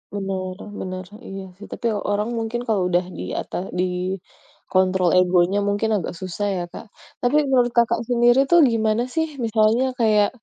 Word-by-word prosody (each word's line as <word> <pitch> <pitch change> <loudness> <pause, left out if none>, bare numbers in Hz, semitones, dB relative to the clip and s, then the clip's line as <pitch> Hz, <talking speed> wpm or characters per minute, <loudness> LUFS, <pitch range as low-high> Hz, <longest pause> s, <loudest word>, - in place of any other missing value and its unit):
Bener 190 -2 -3 0.2
bener, 185 0 -5 0.2
iya 195 0 -6
sih 205 - -11
tapi 235 - -3 0.2
orang 210 +2 0
mungkin 230 +1 -2
kalau 210 -4 +1
udah 175 0 +2
di - - -5 0.2
ata - - -5 0.2
di - - +3 0.9
kontrol 185 -1 +3
egonya 180 +2 +3
mungkin 205 +2 0
agak - - -5
susah 185 +3 -3
ya, 175 - -2
Kak. - - -8 0.4
Tapi 245 +5 +2
menurut 245 -2 +3
Kakak 235 0 +3
sendiri 240 +1 +4
tuh 345 0 +6
gimana 220 +1 +1
sih 320 0 +1 0.2
misalnya 220 +3 +3
kayak 210 -2 +4
210 Hz, 160 wpm, -22 LUFS, 185-235 Hz, 0.9 s, tuh